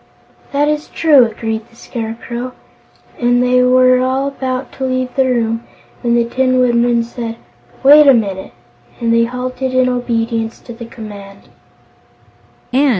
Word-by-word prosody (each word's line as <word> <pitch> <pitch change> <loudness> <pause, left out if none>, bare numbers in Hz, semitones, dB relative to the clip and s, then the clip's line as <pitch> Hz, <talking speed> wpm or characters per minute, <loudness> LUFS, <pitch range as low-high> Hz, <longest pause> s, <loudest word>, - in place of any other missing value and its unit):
"That 285 +1 +1
is 300 0 -1
true," 290 -6 +4
agreed 225 0 -5
the 230 - -23
Scarecrow, 235 +2 -6 0.7
and 245 0 +2
they 250 0 +3
were 255 0 +4
all 260 +2 0
about 260 -1 -4
to 265 - -7
leave 255 -1 -1
the 265 - +3
room 230 -2 0 0.4
when 235 -1 +1
the 235 -1 +2
Tin 255 +2 +1
Woodman 240 -1 +2
said: 230 -1 -6 0.5
"Wait 295 +2 +8
a 275 - +8
minute," 195 - -3 0.5
and 230 -1 +1
they 230 0 +4
halted 255 +1 -4
in 255 0 +3
obedience 230 -2 -2
to 240 - -10
the 230 0 -9
command. 205 -4 -11
245 Hz, 145 wpm, -16 LUFS, 230-255 Hz, 0.7 s, Wait